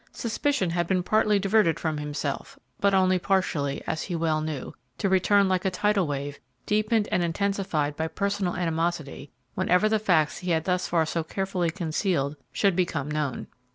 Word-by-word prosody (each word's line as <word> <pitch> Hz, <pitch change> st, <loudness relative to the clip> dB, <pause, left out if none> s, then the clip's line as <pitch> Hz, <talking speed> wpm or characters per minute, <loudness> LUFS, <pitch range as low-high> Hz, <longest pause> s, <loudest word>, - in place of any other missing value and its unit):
Suspicion 230 Hz, -, 0 dB
had 175 Hz, 0 st, 0 dB
been 185 Hz, -1 st, +1 dB
partially 215 Hz, +1 st, +3 dB
diverted 195 Hz, -4 st, +2 dB
from 155 Hz, -2 st, -2 dB
himself, 145 Hz, -1 st, -4 dB, 0.2 s
but 200 Hz, -1 st, +3 dB
only 185 Hz, -1 st, +3 dB
partially, 170 Hz, -8 st, 0 dB
as 160 Hz, -, -2 dB
he 180 Hz, -, -4 dB
well 160 Hz, -2 st, 0 dB
knew, 155 Hz, -4 st, -4 dB, 0.2 s
to -, -, 0 dB
return 195 Hz, +1 st, +4 dB
like 185 Hz, -1 st, +1 dB
a 190 Hz, -, +2 dB
tidal 200 Hz, -1 st, +1 dB
wave, 140 Hz, 0 st, -4 dB, 0.3 s
deepened 215 Hz, +1 st, +1 dB
and 175 Hz, -, +2 dB
intensified 170 Hz, -4 st, -1 dB
by 160 Hz, +1 st, -1 dB
personal 200 Hz, 0 st, -1 dB
animosity, 165 Hz, -4 st, -2 dB, 0.2 s
whenever 185 Hz, +2 st, +2 dB
the 215 Hz, 0 st, +2 dB
facts 175 Hz, -8 st, +2 dB
he 180 Hz, -, -5 dB
had 160 Hz, -2 st, +2 dB
thus 180 Hz, 0 st, 0 dB
far 165 Hz, -2 st, +2 dB
so 165 Hz, +1 st, -2 dB
carefully 185 Hz, 0 st, -1 dB
concealed 160 Hz, -4 st, -1 dB, 0.2 s
should 195 Hz, -3 st, +2 dB
become 170 Hz, -5 st, -1 dB
known. 150 Hz, -4 st, -2 dB
180 Hz, 170 wpm, -26 LUFS, 160-195 Hz, 0.3 s, return